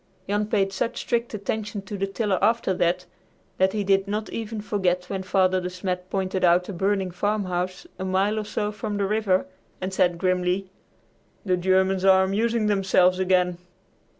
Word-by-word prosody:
Jan 205 Hz, +1 st, 0 dB
paid 195 Hz, -2 st, +1 dB
such 210 Hz, +4 st, -2 dB
strict 235 Hz, 0 st, -1 dB
attention 210 Hz, 0 st, -4 dB
to 200 Hz, +1 st, -6 dB
the 195 Hz, 0 st, -1 dB
tiller 195 Hz, -1 st, -1 dB
after 230 Hz, -4 st, +2 dB
that 180 Hz, 0 st, 0 dB, 0.5 s
that 190 Hz, +1 st, +3 dB
he 210 Hz, -1 st, -1 dB
did 195 Hz, 0 st, +2 dB
not 210 Hz, +2 st, -3 dB
even 225 Hz, -1 st, -4 dB
forget 180 Hz, -4 st, -1 dB
when 195 Hz, -, -2 dB
Father 185 Hz, -1 st, +2 dB
De 180 Hz, -, -3 dB
Smet 180 Hz, 0 st, -4 dB
pointed 190 Hz, -1 st, -2 dB
out 180 Hz, +1 st, +4 dB
a 200 Hz, -, -5 dB
burning 190 Hz, +1 st, 0 dB
farmhouse 185 Hz, -, -2 dB
a -, -, -3 dB
mile 195 Hz, +3 st, +1 dB
or -, -, -2 dB
so 210 Hz, 0 st, -2 dB
from 210 Hz, 0 st, -4 dB
the 200 Hz, -, +1 dB
river 200 Hz, -2 st, +1 dB, 0.3 s
and 185 Hz, +1 st, -4 dB
said 180 Hz, -2 st, +2 dB
grimly, 185 Hz, +1 st, 0 dB, 0.7 s
"The 185 Hz, -2 st, +2 dB
Germans 190 Hz, +1 st, +2 dB
are 190 Hz, -1 st, +6 dB
amusing 220 Hz, +4 st, 0 dB
themselves 190 Hz, -3 st, +3 dB
again." 180 Hz, -2 st, +2 dB
190 Hz, 175 wpm, -25 LUFS, 185-205 Hz, 0.7 s, are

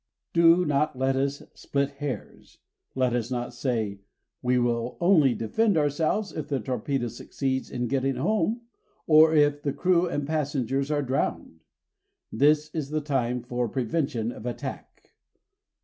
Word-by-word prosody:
Do 170 Hz, +1 st, +5 dB
not 145 Hz, -2 st, 0 dB
let 130 Hz, +1 st, +1 dB
us 140 Hz, +1 st, -1 dB
split 140 Hz, 0 st, -2 dB
hairs. 145 Hz, -3 st, -6 dB, 0.4 s
Let 130 Hz, -2 st, +1 dB
us 120 Hz, -1 st, -1 dB
not 120 Hz, -1 st, -3 dB
say: 115 Hz, -5 st, -2 dB, 0.4 s
"We 125 Hz, 0 st, +2 dB
will 120 Hz, 0 st, 0 dB
only 165 Hz, -8 st, +4 dB
defend 205 Hz, -, +1 dB
ourselves 155 Hz, +8 st, 0 dB
if 155 Hz, -, -5 dB
the 140 Hz, -3 st, -1 dB
torpedo 125 Hz, +2 st, -2 dB
succeeds 130 Hz, +3 st, -3 dB
in 125 Hz, -1 st, -2 dB
getting 135 Hz, +1 st, 0 dB
home, 215 Hz, -, 0 dB, 0.4 s
or 160 Hz, 0 st, +6 dB
if 145 Hz, -1 st, +3 dB
the 140 Hz, -2 st, -1 dB
crew 180 Hz, -1 st, +2 dB
and 145 Hz, -4 st, -2 dB
the -, -, -6 dB
passengers 140 Hz, -3 st, -1 dB
are 145 Hz, -1 st, 0 dB
drowned". 125 Hz, -10 st, -2 dB, 0.7 s
This 150 Hz, +5 st, +3 dB
is 150 Hz, -4 st, -3 dB
the 155 Hz, 0 st, -1 dB
time 125 Hz, -4 st, -1 dB
for 120 Hz, -1 st, -2 dB
prevention 125 Hz, -1 st, -1 dB
of 120 Hz, 0 st, -8 dB
attack. 120 Hz, -, -7 dB
140 Hz, 150 wpm, -26 LUFS, 125-155 Hz, 0.7 s, or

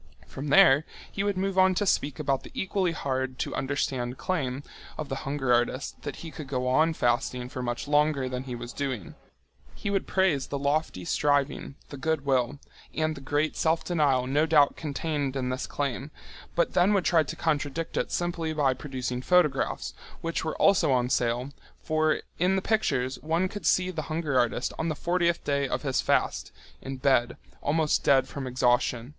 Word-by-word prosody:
From 140 Hz, +3 st, -7 dB
there 145 Hz, -2 st, +6 dB, 0.3 s
he 195 Hz, -, -2 dB
would 200 Hz, -2 st, 0 dB
move 190 Hz, 0 st, 0 dB
on 185 Hz, 0 st, +5 dB
to 205 Hz, -, +1 dB
speak 145 Hz, -6 st, +1 dB
about 140 Hz, -3 st, 0 dB
the -, -, -11 dB
equally 190 Hz, -2 st, 0 dB
hard 130 Hz, -4 st, -2 dB
to -, -, -3 dB
understand 130 Hz, -3 st, -2 dB
claim 140 Hz, -7 st, -2 dB, 0.3 s
of 155 Hz, -2 st, -5 dB
the 135 Hz, -, -2 dB
hunger 135 Hz, -3 st, +1 dB
artist 120 Hz, +3 st, 0 dB
that 145 Hz, -, -5 dB
he 165 Hz, -, -7 dB
could 155 Hz, -3 st, -8 dB
go 125 Hz, -2 st, -2 dB
on 155 Hz, +5 st, +3 dB
fasting 125 Hz, 0 st, 0 dB
for 130 Hz, -, -5 dB
much 120 Hz, +2 st, -3 dB
longer 145 Hz, -2 st, +2 dB
than 130 Hz, 0 st, -4 dB
he 125 Hz, -2 st, -5 dB
was 120 Hz, 0 st, -7 dB
doing. 130 Hz, -9 st, -4 dB, 0.6 s
He 200 Hz, -, -3 dB
would 195 Hz, -, 0 dB
praise 185 Hz, -8 st, +1 dB
the 140 Hz, -, -3 dB
lofty 140 Hz, -, -1 dB
striving, 145 Hz, -, 0 dB
the 140 Hz, -, -8 dB
good 155 Hz, 0 st, -1 dB
will, 130 Hz, 0 st, +1 dB, 0.4 s
and 155 Hz, +1 st, 0 dB
the 140 Hz, -, -10 dB
great 145 Hz, +3 st, 0 dB
self 160 Hz, 0 st, +1 dB
denial 145 Hz, -7 st, +2 dB
no 145 Hz, +5 st, +2 dB
doubt 150 Hz, -2 st, +5 dB
contained 145 Hz, -2 st, -2 dB
in 130 Hz, -2 st, -1 dB
this 130 Hz, +1 st, -3 dB
claim, 140 Hz, 0 st, -3 dB, 0.5 s
but 170 Hz, -, +1 dB
then 185 Hz, +4 st, +4 dB
would 190 Hz, -, +1 dB
try 170 Hz, -3 st, +4 dB
to 145 Hz, -, -4 dB
contradict 155 Hz, 0 st, -2 dB
it -, -, -1 dB
simply 170 Hz, -2 st, -1 dB
by 145 Hz, -4 st, +2 dB
producing 125 Hz, -2 st, -4 dB
photographs, 150 Hz, -3 st, +1 dB, 0.3 s
which 165 Hz, 0 st, -2 dB
were 160 Hz, -, -2 dB
also 185 Hz, -7 st, +4 dB
on 125 Hz, -1 st, +1 dB
sale, 120 Hz, +3 st, 0 dB, 0.3 s
for 155 Hz, 0 st, +1 dB, 0.2 s
in 180 Hz, +3 st, +3 dB
the 190 Hz, -, +1 dB
pictures 135 Hz, -, 0 dB
one 165 Hz, +4 st, +1 dB
could 205 Hz, +2 st, -5 dB
see 185 Hz, 0 st, +3 dB
the 165 Hz, -3 st, -3 dB
hunger 155 Hz, -3 st, -1 dB
artist 120 Hz, +1 st, 0 dB
on 160 Hz, -, 0 dB
the 155 Hz, -, -2 dB
fortieth 170 Hz, +2 st, 0 dB
day 140 Hz, -1 st, 0 dB
of -, -, -3 dB
his 135 Hz, -2 st, +1 dB
fast, -, -, 0 dB, 0.3 s
in 135 Hz, 0 st, -6 dB
bed, 130 Hz, -2 st, +2 dB, 0.2 s
almost 155 Hz, +1 st, +1 dB
dead 135 Hz, -1 st, +4 dB
from 135 Hz, -1 st, -6 dB
exhaustion. 125 Hz, -1 st, +1 dB
145 Hz, 185 wpm, -27 LUFS, 130-160 Hz, 0.6 s, there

